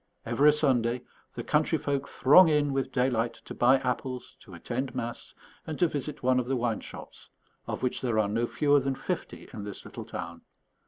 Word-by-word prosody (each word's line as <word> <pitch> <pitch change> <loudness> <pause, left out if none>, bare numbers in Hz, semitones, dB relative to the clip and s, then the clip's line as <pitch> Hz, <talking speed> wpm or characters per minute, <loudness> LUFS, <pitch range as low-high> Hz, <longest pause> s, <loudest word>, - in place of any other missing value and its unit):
Every 140 +6 +5
Sunday 125 -5 +1 0.3
the - - -4
country - - +2
folk 140 -1 -2
throng 160 +6 +6
in 145 -2 +2
with 135 -1 -1
daylight 125 -2 0
to - - -7
buy 130 +3 +4
apples, 125 0 -4
to 95 -6 -13
attend 125 +9 -4
mass, 115 0 -5 0.3
and 155 -2 -4
to 175 - +4
visit 145 -2 -5
one 130 0 +3
of 125 - -3
the 135 - 0
wine 120 -3 -1
shops, - - -11 0.4
of - - -4
which 125 - -1
there 120 -4 0
are 110 -2 +3
no 115 +3 0
fewer 145 +2 +3
than 135 0 -1
fifty - - -5
in 105 - -6
this 100 -1 -8
little - - -8
town. - - -7
130 Hz, 195 wpm, -28 LUFS, 120-140 Hz, 0.4 s, throng